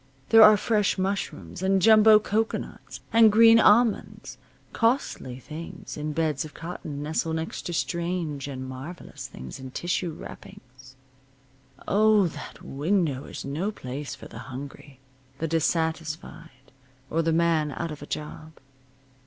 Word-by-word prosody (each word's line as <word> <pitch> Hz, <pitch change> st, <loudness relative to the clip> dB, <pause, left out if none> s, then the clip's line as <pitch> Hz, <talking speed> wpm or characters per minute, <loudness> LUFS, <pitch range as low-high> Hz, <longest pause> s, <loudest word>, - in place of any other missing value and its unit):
There 225 Hz, -, +8 dB
are 215 Hz, -1 st, +9 dB
fresh 210 Hz, -1 st, +1 dB
mushrooms, 185 Hz, -, -3 dB
and 190 Hz, 0 st, +2 dB
jumbo 215 Hz, +2 st, +7 dB
cocoanuts, 215 Hz, +1 st, -3 dB
and 225 Hz, -1 st, +7 dB
green 225 Hz, +1 st, +7 dB
almonds; 205 Hz, -, +2 dB, 0.3 s
costly 230 Hz, -, 0 dB
things 155 Hz, +5 st, -9 dB
in 150 Hz, +1 st, -4 dB
beds 155 Hz, -2 st, 0 dB
of 155 Hz, -, -11 dB
cotton 160 Hz, -4 st, -6 dB
nestle 160 Hz, +1 st, -1 dB
next 160 Hz, 0 st, -4 dB
to 175 Hz, -, -4 dB
strange 170 Hz, -4 st, -2 dB
and 130 Hz, -2 st, -6 dB
marvelous 135 Hz, +7 st, -8 dB
things 65 Hz, -, -9 dB
in 130 Hz, 0 st, -8 dB
tissue, 175 Hz, +4 st, -2 dB
wrappings. 130 Hz, -3 st, -13 dB, 0.9 s
Oh, 215 Hz, -1 st, +4 dB
that -, -, -10 dB
window 150 Hz, -2 st, -1 dB
is -, -, -8 dB
no 155 Hz, +9 st, -2 dB
place 140 Hz, -7 st, -6 dB
for -, -, -11 dB
the 115 Hz, -, -10 dB
hungry, 135 Hz, +1 st, -9 dB, 0.4 s
the 165 Hz, -, -2 dB
dissatisfied, 160 Hz, -3 st, -3 dB, 0.4 s
or 165 Hz, -, +1 dB
the 165 Hz, 0 st, +1 dB
man 165 Hz, -2 st, +2 dB
out 165 Hz, +3 st, -4 dB
of 150 Hz, -, -8 dB
a 145 Hz, -, -9 dB
job. 155 Hz, +1 st, -6 dB
160 Hz, 135 wpm, -26 LUFS, 140-195 Hz, 0.9 s, are